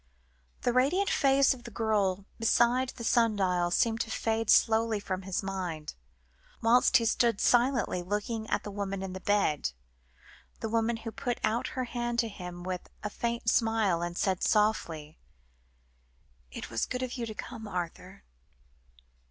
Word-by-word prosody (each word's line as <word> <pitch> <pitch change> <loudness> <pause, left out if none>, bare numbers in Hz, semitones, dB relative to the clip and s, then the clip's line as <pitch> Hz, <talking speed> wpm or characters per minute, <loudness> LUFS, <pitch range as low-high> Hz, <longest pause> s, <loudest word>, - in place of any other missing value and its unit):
The 245 - +1
radiant 300 +11 +2
face 275 -1 +4
of 250 -2 -12
the 235 - -8
girl 205 -4 0
beside 240 +3 +3
the 235 - -7
sun 230 -1 +3
dial 180 -3 +1
seemed 225 +5 +1
to 225 - -3
fade 225 0 -1
slowly 225 -1 +4
from 190 -2 -4
his 190 +1 -3
mind, 180 -5 -4 0.7
whilst 240 +3 +5
he 230 - -1
stood 230 -1 +2
silently 245 -6 +2
looking 210 +4 -3
at - - 0
the 205 - -6
woman 195 -1 -3
in 190 -1 -5
the 190 - -6
bed, 190 - +1 0.9
the 225 - -3
woman 230 +1 +1
who 225 0 -6
put 245 +1 -3
out 225 +3 +1
her 255 - +1
hand 240 -1 -3
to 230 -1 +1
him 180 -3 -8
with 185 0 -5
a 210 - -3
faint 235 0 -3
smile, 225 -7 +2
and 175 0 -4
said 190 -2 0
softly 170 -8 0 1.3
"It 60 - -8
was 115 - -1
good 255 0 -3
of 255 - -4
you 240 -3 -4
to 215 - -7
come, 220 -1 -7
Arthur. 180 +1 -6
220 Hz, 160 wpm, -29 LUFS, 190-235 Hz, 1.3 s, whilst